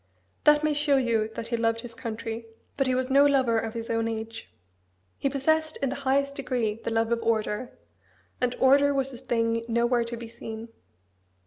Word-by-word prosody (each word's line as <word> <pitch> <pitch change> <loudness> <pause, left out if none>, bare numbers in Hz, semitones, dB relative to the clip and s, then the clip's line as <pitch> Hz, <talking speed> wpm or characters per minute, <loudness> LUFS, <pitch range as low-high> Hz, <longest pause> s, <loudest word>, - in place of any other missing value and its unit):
That 300 0 +6
may 305 -1 +2
show 290 -1 +3
you 230 -4 +1
that 230 - -5
he 235 - 0
loved 230 0 +1
his 240 -1 -8
country, 230 -1 -5 0.3
but 270 -2 +1
he 255 - +2
was 255 +1 -1
no 280 +1 +6
lover 260 -5 +3
of 225 +1 -5
his 230 0 -4
own 225 0 0
age. 225 0 -6 0.7
He 275 - +1
possessed 315 +3 +1
in 275 - -1
the 270 - -4
highest 280 +1 +2
degree 240 -5 -2
the - - -2
love 225 0 +1
of 235 0 +1
order; 225 +1 -1 0.6
and 250 0 +1
order 280 +2 +5
was 270 0 -1
a - - -7
thing 230 -2 0
nowhere 235 +1 +2
to 235 0 -5
be 235 0 -7
seen. 225 0 -8
235 Hz, 195 wpm, -27 LUFS, 230-270 Hz, 0.7 s, That